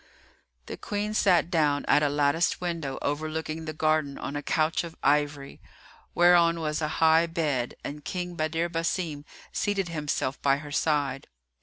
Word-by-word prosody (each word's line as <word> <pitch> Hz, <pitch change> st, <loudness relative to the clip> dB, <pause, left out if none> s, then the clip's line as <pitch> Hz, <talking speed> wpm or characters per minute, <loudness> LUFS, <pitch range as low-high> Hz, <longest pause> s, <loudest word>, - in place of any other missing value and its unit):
The -, -, -7 dB
Queen 210 Hz, +1 st, -3 dB
sat 180 Hz, -4 st, +3 dB
down 150 Hz, -4 st, +2 dB
at 150 Hz, -, +4 dB
a 145 Hz, -, +2 dB
latticed 145 Hz, +3 st, +1 dB
window 165 Hz, -6 st, -3 dB
overlooking 155 Hz, +2 st, -3 dB
the 155 Hz, -, -3 dB
garden 155 Hz, -2 st, 0 dB
on 140 Hz, -, -5 dB
a 145 Hz, -, -2 dB
couch 155 Hz, +3 st, 0 dB
of 170 Hz, -1 st, -8 dB
ivory, 145 Hz, -1 st, 0 dB, 0.5 s
whereon 170 Hz, -1 st, +5 dB
was 155 Hz, -1 st, -2 dB
a 155 Hz, -, 0 dB, 0.2 s
high 160 Hz, +1 st, +5 dB
bed, 150 Hz, -8 st, -1 dB
and 150 Hz, +1 st, -6 dB
King 180 Hz, +1 st, -4 dB
Badr 165 Hz, +1 st, -1 dB
Basim 165 Hz, -3 st, -2 dB, 0.3 s
seated 200 Hz, -4 st, -1 dB
himself 150 Hz, -4 st, -2 dB
by 140 Hz, 0 st, +3 dB
her 145 Hz, 0 st, -9 dB
side. 145 Hz, -3 st, 0 dB
155 Hz, 155 wpm, -27 LUFS, 145-170 Hz, 0.5 s, whereon